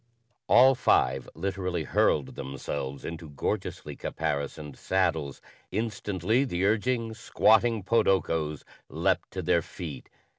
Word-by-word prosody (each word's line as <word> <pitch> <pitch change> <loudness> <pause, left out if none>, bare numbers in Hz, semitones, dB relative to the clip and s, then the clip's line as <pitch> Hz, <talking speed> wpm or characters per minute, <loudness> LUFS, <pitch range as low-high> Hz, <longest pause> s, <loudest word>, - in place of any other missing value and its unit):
All 130 +3 +7
five 65 - +2
literally 90 -3 -2
hurled 70 -1 +1
themselves 70 0 -5
into 80 -1 -6
gorgeously 70 - -3
caparisoned 70 0 -3
saddles. 80 -5 -1 0.3
Instantly, 110 +1 0
the 95 -8 -1
urging 115 +2 +1
squatting 110 0 +3
podokos 85 -8 +1 0.3
leaped - - 0
to 95 - -5
their 85 0 +3
feet. 80 -2 -8
90 Hz, 105 wpm, -28 LUFS, 75-110 Hz, 0.3 s, All